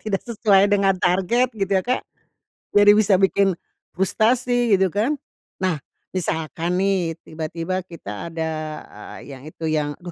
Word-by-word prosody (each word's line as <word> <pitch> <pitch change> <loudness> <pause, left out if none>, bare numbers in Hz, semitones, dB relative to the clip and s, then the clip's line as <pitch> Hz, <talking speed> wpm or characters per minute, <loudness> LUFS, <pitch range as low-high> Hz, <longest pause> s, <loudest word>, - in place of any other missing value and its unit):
Tidak 200 -3 -1
sesuai 205 -4 +3
dengan 195 -1 +4
target 195 +8 +2
gitu 195 -1 -1
ya - - -9
Kak, 250 +4 -1 0.7
jadi 205 0 +8
bisa 215 -2 +4
bikin 195 0 +3 0.4
frustasi 240 +4 +2
gitu 190 -1 +2
kan. 230 - +1 0.5
Nah, 185 -4 +1 0.3
misalkan 165 -1 -2
nih 190 -4 +1
tiba-tiba 165 +3 -4
kita 105 - -7
ada, 160 -1 -2 0.7
eee, - - -13
yang 130 - -15
itu 160 +1 -7
yang 150 -1 0
duh, 175 - -7
190 Hz, 140 wpm, -22 LUFS, 165-205 Hz, 0.7 s, jadi